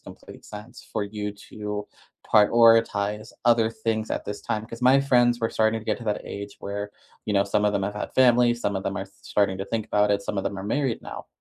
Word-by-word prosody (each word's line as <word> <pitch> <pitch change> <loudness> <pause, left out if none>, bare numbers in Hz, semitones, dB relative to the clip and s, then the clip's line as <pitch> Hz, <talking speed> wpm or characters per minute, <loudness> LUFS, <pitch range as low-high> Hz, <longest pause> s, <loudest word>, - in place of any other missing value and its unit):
complete - - -13
sense 105 +1 -11
for 110 - -1
you 105 0 -4 0.2
to 105 -1 -5 0.5
prioritize 105 -1 +4
other 115 -2 +4
things 110 -1 -2
at - - -2
this 105 0 -5
time. 105 0 -3
'Cause 115 0 -9
my 130 +2 +6
friends 120 -3 +3
were 115 - 0
starting 110 0 +1
to - - -14
get - - -1
to 120 - -9
that 105 -1 -1
age 100 0 -7
where, 100 +1 -5 0.3
you 105 - -2
know, 100 -1 +4
some 100 +1 0
of 105 - +2
them 100 - 0
have 100 +1 -2
had 105 - -5
families, 120 -2 +4
some 100 - -1
of 95 - -3
them 100 - -2
are 95 - -4
sh - - -22
starting 95 -2 0
to 95 - -3
think 110 +1 -3
about 105 0 +2
it, 100 0 0
some 105 - -4
of 95 - -2
them 100 - -3
are 95 - -5
married 130 +3 -1
now. - - -8
105 Hz, 240 wpm, -25 LUFS, 100-115 Hz, 0.5 s, my